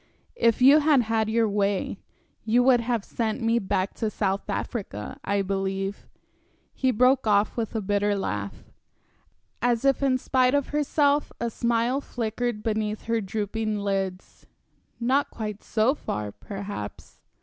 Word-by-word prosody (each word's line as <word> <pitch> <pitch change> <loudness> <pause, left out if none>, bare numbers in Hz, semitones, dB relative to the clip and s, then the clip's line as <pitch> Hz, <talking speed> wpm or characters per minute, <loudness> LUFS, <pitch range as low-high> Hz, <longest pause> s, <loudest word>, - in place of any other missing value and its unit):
"If 230 +1 +3
you 280 +4 +8
had 295 -3 +4
had 220 -1 0
your 225 0 +2
way, 200 -1 -1 0.4
you 235 +3 +3
would 250 -1 +5
have 235 -3 -1
sent 225 0 -2
me 230 0 +2
back 190 -2 -1
to 220 - -1
South 200 -1 -2
Africa, 195 - -4
I 200 0 0
believe." 195 +1 -3 0.7
He 260 - +1
broke 255 +1 +3
off 205 0 +3
with 230 -1 -3
a 220 - 0
bitter 205 +1 +1
laugh. 105 - -4 1.0
As 240 +1 +1
if 275 -1 +3
in 265 -2 +3
spite 255 +1 +2
of 285 -2 0
herself, 295 0 +1
a 235 0 -2
smile 235 +4 0
flickered 230 -2 -3
beneath 215 -1 -1
her 230 0 0
drooping 215 +2 -2
lids. 195 -2 -3 0.5
"Not 260 +4 +1
quite 210 -2 -5
so 225 +4 +2
far, 105 - -4
perhaps." 195 - -8
220 Hz, 145 wpm, -26 LUFS, 200-245 Hz, 1.0 s, you